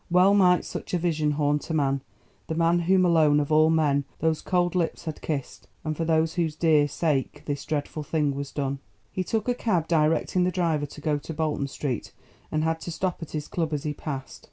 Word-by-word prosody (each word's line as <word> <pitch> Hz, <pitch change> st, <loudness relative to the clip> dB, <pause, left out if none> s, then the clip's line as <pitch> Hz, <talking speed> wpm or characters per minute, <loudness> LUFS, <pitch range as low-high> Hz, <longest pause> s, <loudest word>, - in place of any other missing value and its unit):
Well 180 Hz, +3 st, +5 dB
might 180 Hz, -3 st, +4 dB
such -, -, -4 dB
a -, -, +3 dB
vision 155 Hz, -3 st, 0 dB
haunt 145 Hz, +1 st, 0 dB
a 160 Hz, -, 0 dB
man, 140 Hz, -2 st, +1 dB, 0.5 s
the 160 Hz, -, -2 dB
man 170 Hz, +1 st, +3 dB
whom 185 Hz, +2 st, +3 dB
alone 155 Hz, -4 st, +4 dB
of 145 Hz, +1 st, -2 dB
all 155 Hz, +1 st, +5 dB
men 150 Hz, -3 st, +2 dB
those 160 Hz, -1 st, 0 dB
cold 175 Hz, -2 st, +1 dB
lips 175 Hz, -2 st, -1 dB
had 160 Hz, -2 st, -5 dB
kissed, 145 Hz, -4 st, -4 dB, 0.2 s
and 155 Hz, -1 st, -2 dB
for 165 Hz, -, -2 dB
whose 160 Hz, 0 st, +1 dB
dear 155 Hz, -3 st, +4 dB
sake 145 Hz, -1 st, -1 dB
this 145 Hz, -1 st, -3 dB
dreadful 150 Hz, 0 st, -3 dB
thing 150 Hz, -1 st, 0 dB
was 140 Hz, 0 st, -5 dB
done. 140 Hz, -1 st, -2 dB, 0.3 s
He 185 Hz, -, -2 dB
took 220 Hz, +4 st, -2 dB
a 245 Hz, -, +3 dB
cab 185 Hz, -9 st, 0 dB
directing 165 Hz, +3 st, +2 dB
the 180 Hz, -, +2 dB
driver 165 Hz, -5 st, 0 dB
to 150 Hz, -, -12 dB
go 150 Hz, -1 st, 0 dB
to 160 Hz, -, -7 dB
Bolton 150 Hz, -3 st, -1 dB
Street 135 Hz, -3 st, -4 dB, 0.4 s
and 155 Hz, 0 st, 0 dB, 0.2 s
to 170 Hz, -, -6 dB
stop 180 Hz, +2 st, -2 dB
at 165 Hz, -, -8 dB
his 150 Hz, -1 st, -3 dB
club 160 Hz, -3 st, -2 dB
as 145 Hz, -, -2 dB
he 150 Hz, -, -2 dB
passed. 140 Hz, -3 st, -6 dB
155 Hz, 210 wpm, -26 LUFS, 145-170 Hz, 0.5 s, Well